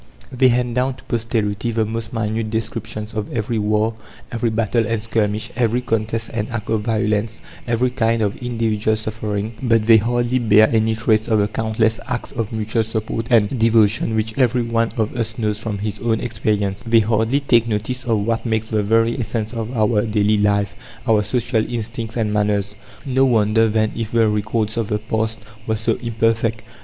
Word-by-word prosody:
They 130 +1 +4
hand 120 -1 +1
down 125 +2 0
to - - -17
posterity 115 -1 -1
the 115 -1 0
most 115 +1 -4
minute 110 -1 -2
descriptions 110 -1 -4
of 105 -1 -4
every 115 0 -1
war, 105 +1 +1 0.4
every 115 0 0
battle 110 0 0
and 115 -2 -2
skirmish, 110 0 -1
every 120 +1 +1
contest 115 -1 -1
and 105 -2 -2
act 115 -2 -4
of 110 -1 +1
violence, 110 0 -1 0.3
every 120 +2 +1
kind 115 -3 +1
of 100 -1 -1
individual 110 -3 0
suffering; 110 0 -3
but 115 -4 +2
they 115 0 +7
hardly 120 +3 +1
bear 110 -2 +5
any 110 -1 +2
trace 110 -1 +1
of 110 - +2
the 105 -1 +2
countless 110 +1 0
acts 125 -1 -3
of 115 -3 -3
mutual 110 +1 0
support 110 +1 -3
and 115 +1 +3
devotion 110 -1 +3
which 110 0 -1
every 125 -1 +3
one 115 0 0
of 110 0 -1
us 115 -2 -2
knows 105 -2 -1
from 110 -2 -4
his 105 +1 -4
own 115 -1 0
experience; 105 -3 -1
they 115 -1 +4
hardly 110 +5 +1
take 120 -5 +3
notice 115 +4 -2
of 110 -4 0
what 115 0 -1
makes 110 -2 -1
the 110 -1 +2
very 115 +3 +2
essence 110 -1 -3
of 115 0 -4
our 110 0 +3
daily 105 -1 +2
life 100 -1 +1 0.3
our 110 -2 +4
social 115 +1 0
instincts 115 0 -4
and 110 -2 0
manners. 105 -1 0 0.3
No 130 -1 +2
wonder, 110 -2 +3
then, 110 0 +1
if 115 -1 -4
the 115 -1 +4
records 110 +1 -1
of 115 -3 0
the 105 - 0
past 110 +1 -2 0.3
were 110 -1 0
so 110 +1 +1
imperfect. 115 -1 0
110 Hz, 185 wpm, -20 LUFS, 105-115 Hz, 0.4 s, they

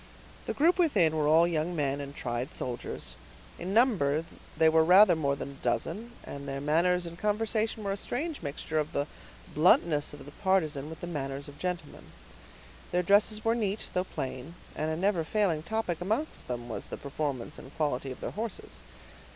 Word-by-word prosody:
The - - -2
group 340 +5 +4
within 195 - +4
were 150 -1 +1
all 160 +2 +6
young 170 +1 -1
men 140 -2 0
and 140 0 -7
tried 120 +4 -3
soldiers; 125 -2 -4 0.5
in 180 +2 -4
number 180 - +3 0.3
they 160 - +5
were 160 0 +5
rather 185 +2 +7
more 140 -3 +1
than 140 - -6
a 140 - -15
dozen, 225 +8 -1
and 140 0 -7
their 135 0 -3
manners 170 +5 +2
and 170 0 -8
conversation 215 +1 0
were 200 - -1
a 195 - -2
strange 295 +9 -3
mixture 155 +2 -2
of 150 - -2
the 140 - 0 0.5
bluntness 155 -1 +4
of 145 - -10
the 145 - -10
partisan 155 -6 0
with 160 - -9
the - - -3
manners 140 -4 -4
of 145 0 -12
gentlemen. 180 -4 -4 0.9
Their 180 0 +2
dresses 210 +3 +3
were 225 - +4
neat, 215 -3 -1
though 180 - +1
plain; 135 0 -5 0.2
and 155 +1 -1
a 160 - -1
never 185 -2 +2
failing 180 -3 +1
topic 180 -2 -2
amongst 220 - -2
them 120 -1 -4
was 115 - -5
the - - -6
performance 140 -1 -4
and - - -11
quality 140 -3 -1
of 130 - -9
their - - -3
horses. 220 -1 -5
160 Hz, 185 wpm, -29 LUFS, 145-200 Hz, 0.9 s, rather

